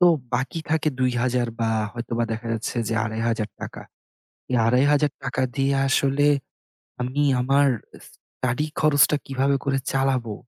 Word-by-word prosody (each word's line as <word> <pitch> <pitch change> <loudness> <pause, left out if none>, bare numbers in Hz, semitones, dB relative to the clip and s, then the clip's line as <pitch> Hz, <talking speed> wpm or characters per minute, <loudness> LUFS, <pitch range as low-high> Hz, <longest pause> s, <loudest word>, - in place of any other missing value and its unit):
তো 180 - +7 0.3
বাকি 135 +6 -2
থাকে 160 -1 +2
৳২,০০০ 125 -1 +1
বা 115 - +1 0.2
হয়তোবা 120 0 -2
দেখা 115 +1 -5
যাচ্ছে 115 +2 -3
যে 115 - -1
৳২৫০০। 110 -1 -3 0.7
এই 125 - +2
৳২৫০০ 135 0 +2
দিয়ে 135 0 +2
আসলে 140 +2 +2 0.7
আমি 130 +4 -1 0.2
আমার 140 +3 +3 0.4
স্টাডি 130 +4 -4
খরচটা 150 -1 +4
কীভাবে 135 +1 +1
করে 135 -1 +1
চালাবো? 130 -5 0
130 Hz, 120 wpm, -24 LUFS, 120-140 Hz, 0.7 s, তো